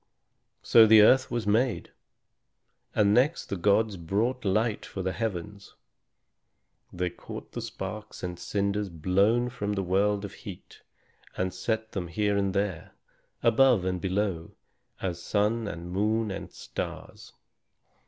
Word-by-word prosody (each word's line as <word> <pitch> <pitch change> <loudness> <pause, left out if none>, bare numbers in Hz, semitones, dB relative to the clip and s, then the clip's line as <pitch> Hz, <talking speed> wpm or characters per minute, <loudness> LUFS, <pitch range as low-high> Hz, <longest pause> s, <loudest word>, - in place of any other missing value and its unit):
So 115 -1 +7
the 110 -1 +8
earth 130 +4 +5
was 120 -3 -2
made. 115 +3 +1 1.0
And 100 -1 +4
next 135 +8 +2
the - - -1
gods 100 +2 +2
brought 105 +10 -1
light 105 +2 0
for 95 - -6
the 95 - -1
heavens. 100 -2 -5 1.2
They 90 0 -2
caught - - -9
the - - -5
sparks 105 0 -7
and 90 -1 -4
cinders 100 0 -1
blown 100 +9 +1
from 105 -4 -3
the 100 -1 -1
world 100 +3 +1
of 100 - -8
heat, - - -11 0.6
and 95 -1 -1
set 110 +4 -2
them 95 -4 -4
here 105 +4 0
and 100 -1 0
there, 100 -5 -2 0.5
above 120 -5 +4
and 90 -1 -1
below, 95 -3 -2 0.5
as 85 -3 -3
sun 105 +3 0
and 85 -2 -6
moon 105 +3 0
and - - -6
stars. - - -7
100 Hz, 135 wpm, -28 LUFS, 95-110 Hz, 1.2 s, the